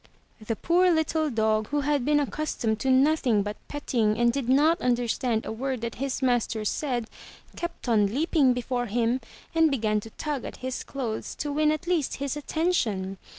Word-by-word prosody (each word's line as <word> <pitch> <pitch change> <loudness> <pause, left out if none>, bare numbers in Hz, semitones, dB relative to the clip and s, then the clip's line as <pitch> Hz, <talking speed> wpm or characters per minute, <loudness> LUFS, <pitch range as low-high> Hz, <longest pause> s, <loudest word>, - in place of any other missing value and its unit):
*' - - -35
The 225 - 0
poor 360 - +3
little 315 -1 +1
dog 220 -3 +1
who 290 0 0
had 285 -2 +1
been 295 +2 +3
accustomed 270 -7 -1
to 265 - -1
nothing 260 -5 +3
but 210 +1 -5
petting 230 -7 0
and 235 0 +3
did 275 -3 -2
not 305 +6 +4
understand 240 -1 0
a - - -4
word 255 +2 -3
that 235 0 -3
his 275 0 -2
master 235 -3 +1
said, 245 0 -1 0.5
kept 345 -6 -6
on 215 -4 +4
leaping 280 +3 +2
before 245 0 -2
him 235 +3 0 0.3
and 325 -1 +4
began 215 -6 +1
to 225 - -10
tug 290 +3 -4
at - - -7
his 260 0 -3
clothes 240 -6 -4
to 290 - -3
win 305 +1 +2
at 310 +2 -3
least 345 -6 0
his 280 0 -3
attention. 235 - -1
260 Hz, 185 wpm, -26 LUFS, 225-295 Hz, 0.5 s, not